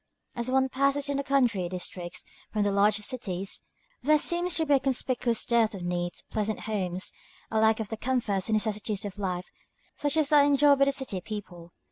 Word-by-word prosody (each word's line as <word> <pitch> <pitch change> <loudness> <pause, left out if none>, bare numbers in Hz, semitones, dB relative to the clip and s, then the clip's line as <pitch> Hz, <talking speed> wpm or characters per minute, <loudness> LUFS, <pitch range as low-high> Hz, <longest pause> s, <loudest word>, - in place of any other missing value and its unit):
As 235 +1 -2
one 265 0 +3
passes 275 +2 +1
into 280 0 0
the - - -12
country 235 -10 +2
districts 180 -1 -5 0.3
from 210 -1 +1
the 205 - +1
large 200 +1 +4
cities, 200 -4 -3 0.4
there 305 +1 +4
seems 345 +3 +1
to 320 - +2
be 290 - +3
a 275 - +5
conspicuous 255 -3 0
dearth 230 -3 +2
of 185 - -7
neat, 175 0 -3
pleasant 215 0 -1
homes, 185 -4 -2 0.4
a 220 - +2
lack 220 0 +4
of 215 -2 -4
the 220 - -4
comforts 225 -6 -1
and 220 - +3
necessities 210 -1 -1
of 205 0 -6
life 180 -2 -3 0.4
such 290 +1 -1
as 310 -2 +2
are 290 -1 +8
enjoyed 285 0 +5
by 275 - +6
city 265 -9 -2
people. 175 -5 -8
220 Hz, 190 wpm, -28 LUFS, 195-275 Hz, 0.4 s, are